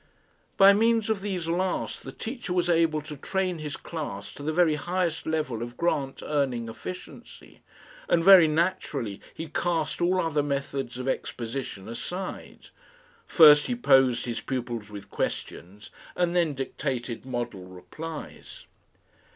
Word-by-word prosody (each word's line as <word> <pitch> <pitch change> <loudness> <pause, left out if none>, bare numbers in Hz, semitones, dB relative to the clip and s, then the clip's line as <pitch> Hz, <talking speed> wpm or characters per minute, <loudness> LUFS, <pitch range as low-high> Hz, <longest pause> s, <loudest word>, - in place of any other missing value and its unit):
By 195 0 +8
means 225 +1 +2
of 205 -3 -1
these 185 -5 -3
last 180 +2 -1
the - - -8
teacher 235 -5 -5
was 175 -1 +2
able 165 -2 +2
to 150 0 -8
train 185 +3 -2
his 150 -1 -5
class 100 -11 -6
to 135 - -11
the 150 +2 -1
very 165 -1 +3
highest 175 +1 -2
level 155 -8 -1
of 120 +1 -6
grant 140 -5 -1
earning 130 -6 -1
efficiency, 180 +10 -10 0.5
and 165 - +3
very 190 -3 +9
naturally 150 - -1
he 160 - -7
cast 165 0 -1
all 180 +2 +2
other 160 -4 +1
methods 140 -3 -3
of 130 +1 -5
exposition 115 -5 -4
aside. 180 +11 -6 0.6
First 150 -3 +7
he 245 - -1
posed 135 - +4
his 120 -2 -3
pupils 120 -5 -4
with 100 -1 -10
questions 100 +4 -5 0.2
and 175 0 0
then 165 -5 +2
dictated 130 -3 -4
model 120 -7 -4
replies. 150 - -9
150 Hz, 140 wpm, -27 LUFS, 125-175 Hz, 0.6 s, very